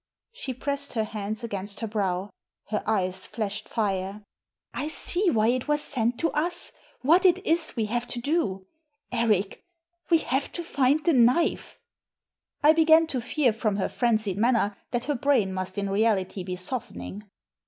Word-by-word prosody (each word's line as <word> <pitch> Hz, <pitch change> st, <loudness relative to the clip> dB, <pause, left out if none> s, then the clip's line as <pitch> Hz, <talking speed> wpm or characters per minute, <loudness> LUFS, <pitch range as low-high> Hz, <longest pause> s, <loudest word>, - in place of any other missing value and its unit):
She 285 Hz, -, -6 dB
pressed 280 Hz, +2 st, -2 dB
her 225 Hz, -3 st, 0 dB
hands 215 Hz, 0 st, -5 dB
against 200 Hz, -2 st, -4 dB
her 225 Hz, -, -2 dB
brow. 195 Hz, -2 st, -2 dB, 0.4 s
Her 215 Hz, -, -1 dB
eyes 190 Hz, -3 st, +1 dB
flashed 215 Hz, -2 st, -4 dB
fire. 200 Hz, -2 st, -2 dB, 0.3 s
" -, -, -52 dB
I -, -, -2 dB
see 355 Hz, +4 st, +1 dB
why 220 Hz, -5 st, +3 dB
it 255 Hz, +2 st, 0 dB
was 295 Hz, 0 st, +1 dB
sent 240 Hz, -3 st, -1 dB
to 330 Hz, -, +1 dB
us, 345 Hz, +3 st, -1 dB, 0.3 s
what 330 Hz, +7 st, +5 dB
it 370 Hz, 0 st, +3 dB
is 325 Hz, 0 st, +1 dB
we 225 Hz, -3 st, 0 dB
have 240 Hz, +3 st, -2 dB
to 240 Hz, -, -3 dB
do. 240 Hz, -, -1 dB, 0.5 s
Eric, 215 Hz, -5 st, +1 dB, 0.5 s
we 335 Hz, -, +6 dB
have 275 Hz, -3 st, -1 dB
to 345 Hz, -, -3 dB
find 285 Hz, -1 st, +1 dB
the 335 Hz, -, +4 dB
knife." 255 Hz, +6 st, +2 dB, 0.9 s
I 305 Hz, +1 st, +7 dB
began 320 Hz, 0 st, +5 dB
to 255 Hz, -, -1 dB
fear, 250 Hz, 0 st, +1 dB
from 215 Hz, -2 st, -1 dB
her 195 Hz, -, 0 dB
frenzied 220 Hz, -5 st, 0 dB
manner, 230 Hz, -3 st, +2 dB
that 240 Hz, 0 st, -2 dB
her 295 Hz, -, 0 dB
brain 245 Hz, -7 st, +1 dB
must 185 Hz, +1 st, -4 dB
in 200 Hz, 0 st, -1 dB
reality 195 Hz, -2 st, +1 dB
be 180 Hz, 0 st, -4 dB
softening. 210 Hz, +1 st, -4 dB
235 Hz, 170 wpm, -26 LUFS, 205-285 Hz, 0.9 s, I